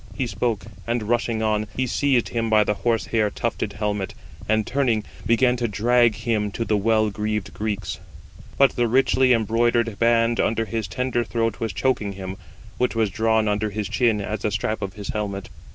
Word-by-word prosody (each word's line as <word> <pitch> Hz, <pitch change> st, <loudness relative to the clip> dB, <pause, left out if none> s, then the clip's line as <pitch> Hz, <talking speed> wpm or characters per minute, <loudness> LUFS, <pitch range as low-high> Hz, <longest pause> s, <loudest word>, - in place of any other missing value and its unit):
He 130 Hz, -, -1 dB
spoke; 115 Hz, -4 st, -2 dB, 0.2 s
and 115 Hz, -1 st, 0 dB
rushing 115 Hz, 0 st, 0 dB
on, 110 Hz, 0 st, 0 dB
he 130 Hz, -, +1 dB
seized 130 Hz, -1 st, +1 dB
him 115 Hz, -1 st, -1 dB
by 110 Hz, -1 st, +5 dB
the 105 Hz, -, 0 dB
horse 115 Hz, +1 st, 0 dB
hair 110 Hz, -2 st, +1 dB
tufted -, -, -3 dB
helmet, 105 Hz, -2 st, -2 dB, 0.3 s
and 110 Hz, -1 st, +2 dB
turning, 125 Hz, -5 st, +1 dB, 0.2 s
began 125 Hz, +2 st, +4 dB
to 120 Hz, -1 st, 0 dB
drag 115 Hz, +2 st, +3 dB
him 105 Hz, -2 st, -1 dB
to 115 Hz, -, -2 dB
the 110 Hz, -, +1 dB
well 110 Hz, +1 st, +2 dB
greaved 105 Hz, -1 st, -3 dB
Greeks: 105 Hz, -1 st, -3 dB, 0.6 s
but 140 Hz, -1 st, +5 dB
the 120 Hz, -1 st, 0 dB
richly 130 Hz, +1 st, +3 dB
embroidered 115 Hz, -1 st, +2 dB
band 115 Hz, 0 st, +3 dB
under 115 Hz, 0 st, +1 dB
his 110 Hz, -1 st, -3 dB
tender 125 Hz, +3 st, -1 dB
throat 115 Hz, -3 st, -1 dB
was 115 Hz, -2 st, -2 dB
choking 115 Hz, -6 st, 0 dB
him, 95 Hz, 0 st, -6 dB, 0.4 s
which 125 Hz, -2 st, +1 dB
was 110 Hz, -3 st, +1 dB
drawn 110 Hz, +1 st, +2 dB
under 105 Hz, +1 st, 0 dB
his 105 Hz, 0 st, -3 dB
chin 115 Hz, -4 st, +1 dB
as 105 Hz, +1 st, -3 dB
the 105 Hz, -, -1 dB
strap 105 Hz, +2 st, -2 dB
of 100 Hz, -1 st, -4 dB
his 100 Hz, 0 st, -8 dB
helmet. 100 Hz, -2 st, -3 dB
110 Hz, 185 wpm, -23 LUFS, 105-120 Hz, 0.6 s, by